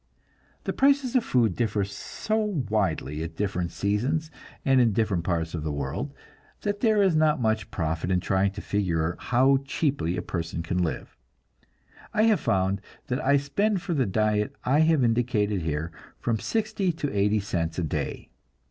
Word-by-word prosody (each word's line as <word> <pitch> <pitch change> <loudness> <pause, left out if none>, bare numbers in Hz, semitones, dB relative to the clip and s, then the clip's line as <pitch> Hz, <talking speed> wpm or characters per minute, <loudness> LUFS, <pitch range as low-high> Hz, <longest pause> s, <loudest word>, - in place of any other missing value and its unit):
The - - -2
prices 275 -2 +3
of 250 - +4
food 115 - +2
differ 105 -3 0
so 105 - -3 0.3
widely 80 -8 0
at 80 0 -5
different 90 -2 -1
seasons 135 +11 -1 0.3
and 135 -1 +5
in 115 -3 +3
different 100 -6 +1
parts 85 -2 -1
of 80 - -3
the 75 - -2
world, 70 - -3 0.5
that 205 -1 -2
there 215 -3 +4
is 185 -4 +3
not 155 -1 +3
much 110 -3 0
profit 80 0 -2
in 90 -1 +2
trying 95 +2 +1
to 105 - -6
figure 85 -5 0
how 130 +2 +3
cheaply 135 - -1
a 90 - -3
person 85 -1 -3
can 90 +2 -1
live. 85 -3 -3 1.0
I 215 - +4
have 220 -3 +4
found 95 +1 +1 0.3
that 130 +5 -1
I 140 +1 +4
spend 180 +8 0
for 180 - -2
the 135 -7 +1
diet 105 +1 +1
I 135 +4 +3
have 160 -3 +4
indicated 115 -4 +1
here, 80 +1 -2 0.3
from 115 -2 0
sixty 215 -4 0
to 145 -6 -3
eighty 105 +2 +3
cents 85 -5 -2
a 90 - 0
day. 75 - -3
105 Hz, 170 wpm, -26 LUFS, 90-145 Hz, 1.0 s, and